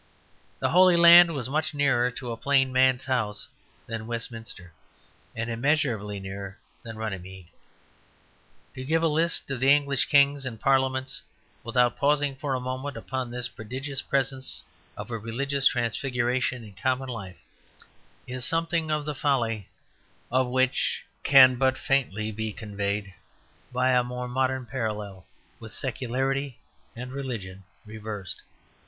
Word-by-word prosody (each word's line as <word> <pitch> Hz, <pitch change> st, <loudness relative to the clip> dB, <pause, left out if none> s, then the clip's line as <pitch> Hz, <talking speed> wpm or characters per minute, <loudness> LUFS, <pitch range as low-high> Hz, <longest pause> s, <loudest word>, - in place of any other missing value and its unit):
The -, -, 0 dB
Holy 180 Hz, 0 st, +6 dB
Land 170 Hz, -1 st, +9 dB
was 130 Hz, -4 st, -2 dB
much 155 Hz, +3 st, -1 dB
nearer 135 Hz, -4 st, +3 dB
to 125 Hz, 0 st, -6 dB
a -, -, -3 dB
plain 135 Hz, +1 st, +2 dB
man's 130 Hz, 0 st, +3 dB
house 115 Hz, -6 st, -1 dB, 0.4 s
than 115 Hz, -1 st, -5 dB
Westminster, 115 Hz, -6 st, -5 dB, 0.6 s
and 115 Hz, 0 st, -3 dB
immeasurably 115 Hz, -5 st, 0 dB
nearer 95 Hz, 0 st, -7 dB, 0.2 s
than 115 Hz, -1 st, -9 dB
Runymede. 95 Hz, -4 st, -6 dB, 1.2 s
To 130 Hz, -, -7 dB
give 160 Hz, +4 st, +1 dB
a -, -, +4 dB
list 160 Hz, -1 st, 0 dB
of 130 Hz, -2 st, -3 dB
English 140 Hz, 0 st, +4 dB
kings 140 Hz, -1 st, +4 dB
and 120 Hz, -4 st, -5 dB
parliaments, 130 Hz, -1 st, +1 dB, 0.4 s
without 120 Hz, +1 st, +1 dB
pausing 145 Hz, -1 st, +2 dB
for 135 Hz, 0 st, -2 dB
a -, -, -1 dB
moment 130 Hz, +3 st, -4 dB
upon 130 Hz, -1 st, -4 dB
this 125 Hz, +1 st, -3 dB
prodigious 130 Hz, +6 st, -5 dB
presence 135 Hz, -1 st, -2 dB, 0.3 s
of -, -, -7 dB
a 115 Hz, -, -3 dB
religious 135 Hz, +5 st, +1 dB
transfiguration 125 Hz, +1 st, 0 dB
in 105 Hz, -2 st, -12 dB
common 130 Hz, +7 st, -1 dB
life, 100 Hz, -7 st, -7 dB, 0.9 s
is 125 Hz, 0 st, -3 dB
something 165 Hz, +2 st, 0 dB
the 150 Hz, -1 st, -1 dB
folly 120 Hz, -8 st, 0 dB, 0.6 s
of 130 Hz, 0 st, +2 dB
which 130 Hz, +1 st, +1 dB, 0.2 s
can 130 Hz, -2 st, +7 dB
but 130 Hz, 0 st, +2 dB
faintly 110 Hz, -7 st, 0 dB
be 110 Hz, 0 st, -4 dB
conveyed 100 Hz, -1 st, -4 dB, 0.6 s
by 125 Hz, +1 st, +2 dB
a 125 Hz, -1 st, +4 dB
more 125 Hz, 0 st, -5 dB
modern 130 Hz, 0 st, 0 dB
parallel, 105 Hz, -6 st, -4 dB, 0.3 s
with -, -, -10 dB
secularity 135 Hz, +1 st, -2 dB, 0.4 s
and 125 Hz, +2 st, -7 dB
religion 115 Hz, -9 st, -6 dB, 0.2 s
reversed. 105 Hz, -3 st, -7 dB
130 Hz, 135 wpm, -26 LUFS, 115-135 Hz, 1.2 s, Land